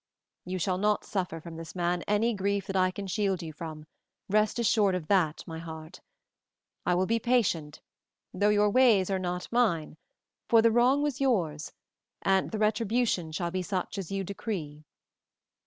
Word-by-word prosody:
"You 185 +1 -3
shall 185 +1 -1
not 210 +1 +1
suffer 180 -5 -3
from 165 0 -9
this 165 +1 -9
man 175 0 0
any 215 +3 +2
grief 200 0 -1
that 195 - -5
I 185 -1 +3
can 195 +2 -6
shield 195 -2 -1
you 160 -1 -7
from, 155 -1 -8 0.4
rest 215 +2 +2
assured 210 -4 +3
of 180 -4 -3
that, 175 -6 +2
my 160 -1 -7
heart. 160 +1 -9 0.9
I 180 - +3
will 185 +1 +2
be 230 +3 +1
patient, 205 -11 0 0.5
though 205 +3 +2
your 210 0 +3
ways 215 -6 +4
are 190 - 0
not 180 0 -4
mine, 180 -11 +1 0.5
for 230 - +6
the 230 - +5
wrong 250 +5 +3
was 285 -2 -2
yours, 170 - 0 0.5
and 190 -1 +2
the 220 - -4
retribution 215 -4 +1
shall 170 +2 -2
be 185 +1 -2
such 185 +1 -3
as 190 -2 -6
you 195 0 -1
decree." 170 -7 -5
190 Hz, 170 wpm, -28 LUFS, 170-215 Hz, 0.9 s, for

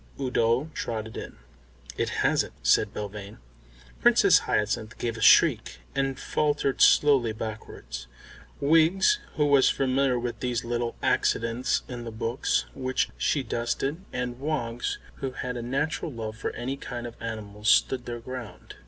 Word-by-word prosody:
Udo 130 +2 +1
trotted 110 -4 -4
in. - - -7 0.6
"It - - -1
hasn't," - - +1
said - - +4
Belvane. 105 0 -7 0.6
Princess - - +6
Hyacinth 110 +1 -1
gave 115 -2 -2
a 110 - -7
shriek, - - +5 0.2
and 135 -1 -1
faltered 145 -2 0
slowly 135 -6 +5
backwards; 85 - -7 0.5
Wiggs, 165 - +4 0.2
who 150 - +2
was 140 -2 +5
familiar 135 -1 +1
with 120 0 -4
these 120 -2 -2
little 120 0 -2
accidents 115 +2 +1
in 120 -2 -6
the 115 - -6
books 115 +3 -1
which 130 -1 -1
she 140 - 0
dusted, 130 +7 -2
and 125 0 -4
Woggs, 125 -5 -2 0.2
who 135 -1 -4
had 125 0 -4
a 120 - -4
natural 140 +6 -2
love 110 -3 -5
for 110 - -3
any 130 +3 -3
kind 120 -3 -6
of 120 - -6
animal, 105 -2 -6
stood 125 +3 +3
their 120 0 -4
ground. 125 -2 -8
120 Hz, 145 wpm, -27 LUFS, 115-135 Hz, 0.6 s, Princess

